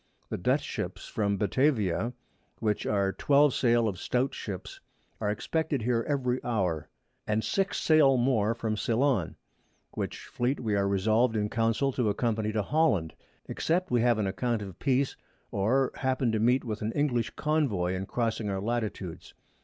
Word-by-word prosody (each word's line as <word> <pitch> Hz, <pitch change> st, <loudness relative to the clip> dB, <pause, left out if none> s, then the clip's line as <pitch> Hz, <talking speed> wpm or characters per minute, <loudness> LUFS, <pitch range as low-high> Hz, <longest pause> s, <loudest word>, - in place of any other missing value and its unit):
The_ -, -, -3 dB
Dutch -, -, +2 dB
Ships -, -, -5 dB
from 100 Hz, -2 st, 0 dB
Batavia 110 Hz, -, +1 dB, 0.4 s
(which 105 Hz, -2 st, -1 dB
are 100 Hz, -2 st, +1 dB
12 145 Hz, -1 st, +4 dB
Sail 120 Hz, -2 st, +3 dB
of 95 Hz, -4 st, -3 dB
stout 125 Hz, +2 st, 0 dB
Ships) 95 Hz, -3 st, -6 dB, 0.4 s
are 105 Hz, -, -1 dB
expected 140 Hz, +4 st, -1 dB
here 115 Hz, 0 st, +1 dB
every 130 Hz, -3 st, 0 dB
Hour, 90 Hz, -10 st, -1 dB, 0.4 s
and 110 Hz, +1 st, +1 dB
six 195 Hz, -1 st, 0 dB
Sail 150 Hz, -4 st, +5 dB
more 115 Hz, -3 st, +2 dB
from 110 Hz, -2 st, -2 dB
Ceilon, 115 Hz, -, +1 dB, 0.6 s
which -, -, -5 dB
Fleet 125 Hz, +3 st, -1 dB
we 110 Hz, -3 st, -1 dB
are 100 Hz, 0 st, +2 dB
resolved 110 Hz, +5 st, +2 dB
in 105 Hz, -1 st, -1 dB
Council 115 Hz, +4 st, +1 dB
to 120 Hz, -4 st, 0 dB
accompany 110 Hz, 0 st, 0 dB
to 105 Hz, -1 st, 0 dB
Holland, 105 Hz, -, +1 dB, 0.3 s
except 180 Hz, +2 st, -1 dB
we 120 Hz, -, +3 dB
have 120 Hz, -1 st, +3 dB
an 105 Hz, -, 0 dB
Account 110 Hz, +3 st, -1 dB
of 95 Hz, -3 st, -9 dB
Peace, 135 Hz, -1 st, +1 dB, 0.4 s
or 125 Hz, +7 st, +2 dB
happen 130 Hz, -2 st, 0 dB
to 110 Hz, -, 0 dB
meet 125 Hz, +4 st, +3 dB
with 110 Hz, -4 st, -4 dB
an 110 Hz, +1 st, -1 dB
English 130 Hz, -5 st, 0 dB
_Convoy 130 Hz, -, 0 dB
in 95 Hz, +1 st, -4 dB
crossing 115 Hz, -3 st, -1 dB
our 95 Hz, -1 st, -1 dB
Latitudes. 105 Hz, -5 st, -4 dB
115 Hz, 160 wpm, -28 LUFS, 105-130 Hz, 0.6 s, Sail